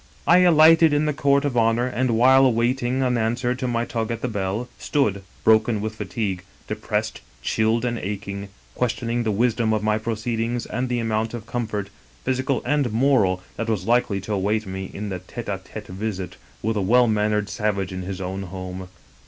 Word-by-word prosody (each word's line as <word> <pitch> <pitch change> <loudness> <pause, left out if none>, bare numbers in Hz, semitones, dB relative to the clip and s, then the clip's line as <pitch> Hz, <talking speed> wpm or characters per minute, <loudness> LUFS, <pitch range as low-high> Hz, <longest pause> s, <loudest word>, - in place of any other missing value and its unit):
" - - -29
I - - +7
alighted 165 -2 +6
in 145 +1 +2
the 150 - +1
court 140 0 +2
of 140 -3 -1
honor, 115 +1 +3
and 125 -2 0
while 130 +3 +6
awaiting 125 +2 +1
an 125 -2 +1
answer 120 +3 0
to 125 0 -3
my 120 -1 0
tug 115 -2 -3
at 115 -1 -3
the - - -1
bell, 105 +1 -2
stood, 105 -10 0 0.2
broken 110 0 +4
with 110 +1 -3
fatigue, 95 -2 -3 0.2
depi^essed, - - -2 0.2
chilled 110 - +1
and 120 -1 -1
aching, 100 0 -5 0.2
questioning 120 0 -1
the 115 - -1
wisdom 115 +1 +1
of 105 -1 0
my 110 0 +1
proceedings 115 +1 -2
and 125 +3 -3
the 125 - 0
amount 115 0 -1
of 110 -2 -7
comfort, 105 -4 -3 0.3
physical 130 0 0
and 145 -5 +1
moral, 110 -7 +2
that 115 0 -2
was 100 -5 -1
likely 120 -3 +2
to 105 +3 -4
await 105 +3 0
me 95 0 -5
in 100 -1 -5
a 90 - -4
tete 115 +6 -8
d 100 - -2
tete 105 +1 -9
visit 95 -1 -4 0.3
with 110 0 0
a - - +1
well 120 +6 +4
mannered 105 -2 +1
savage 105 -3 -1
in 95 - -4
his 95 +1 -5
own 95 +1 -4
home. 95 0 -6
110 Hz, 195 wpm, -23 LUFS, 100-125 Hz, 0.3 s, I